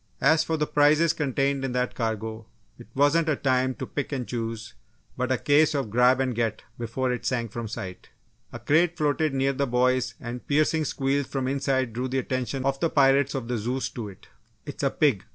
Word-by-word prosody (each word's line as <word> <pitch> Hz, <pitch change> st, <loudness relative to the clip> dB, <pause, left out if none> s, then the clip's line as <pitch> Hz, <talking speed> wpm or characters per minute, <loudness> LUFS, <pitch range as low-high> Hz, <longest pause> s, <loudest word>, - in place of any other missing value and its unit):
As 155 Hz, +4 st, +4 dB
for 160 Hz, 0 st, -1 dB
the 150 Hz, -, +1 dB
prizes 150 Hz, +3 st, +4 dB
contained 140 Hz, -1 st, 0 dB
in 130 Hz, -2 st, -2 dB
that 125 Hz, 0 st, -1 dB
cargo, 110 Hz, -1 st, -3 dB, 0.3 s
it -, -, -12 dB
wasn't 150 Hz, +4 st, +3 dB
a 155 Hz, -, +2 dB
time 130 Hz, -1 st, +1 dB
to -, -, -5 dB
pick 145 Hz, -1 st, -4 dB
and 130 Hz, -4 st, -3 dB
choose, 115 Hz, -2 st, -4 dB, 0.4 s
but 125 Hz, 0 st, -2 dB
a 130 Hz, -, +2 dB
case 150 Hz, +3 st, +3 dB
of 135 Hz, -7 st, -2 dB
"grab 125 Hz, +3 st, +4 dB
and 130 Hz, -1 st, 0 dB
get" 115 Hz, -2 st, -2 dB, 0.2 s
before 120 Hz, +2 st, -2 dB
it 125 Hz, -, -5 dB
sank 115 Hz, -4 st, -1 dB
from 115 Hz, 0 st, -5 dB
sight. 95 Hz, -4 st, -7 dB, 0.4 s
A -, -, -6 dB
crate 160 Hz, +8 st, +2 dB
floated 155 Hz, 0 st, +1 dB
near 135 Hz, +1 st, +1 dB
the 140 Hz, +1 st, -1 dB
boys 125 Hz, 0 st, +1 dB
and 120 Hz, 0 st, -7 dB
piercing 155 Hz, +2 st, +2 dB
squeals 135 Hz, 0 st, -1 dB
from 135 Hz, -2 st, -3 dB
the 130 Hz, -, 0 dB
inside 130 Hz, -3 st, 0 dB
drew 125 Hz, +3 st, -2 dB
the 130 Hz, +1 st, -2 dB
attention 130 Hz, 0 st, -2 dB
of 135 Hz, 0 st, 0 dB
the 165 Hz, -, +1 dB
pirates 140 Hz, 0 st, +3 dB
of 130 Hz, -4 st, -3 dB
the 120 Hz, -2 st, -1 dB
Zeus 125 Hz, +5 st, -2 dB
to 110 Hz, -4 st, -6 dB
it. 95 Hz, -, -15 dB, 0.4 s
"It's 145 Hz, -, -7 dB
a 140 Hz, -, +2 dB
pig!" 135 Hz, -10 st, +1 dB
130 Hz, 210 wpm, -26 LUFS, 120-145 Hz, 0.4 s, As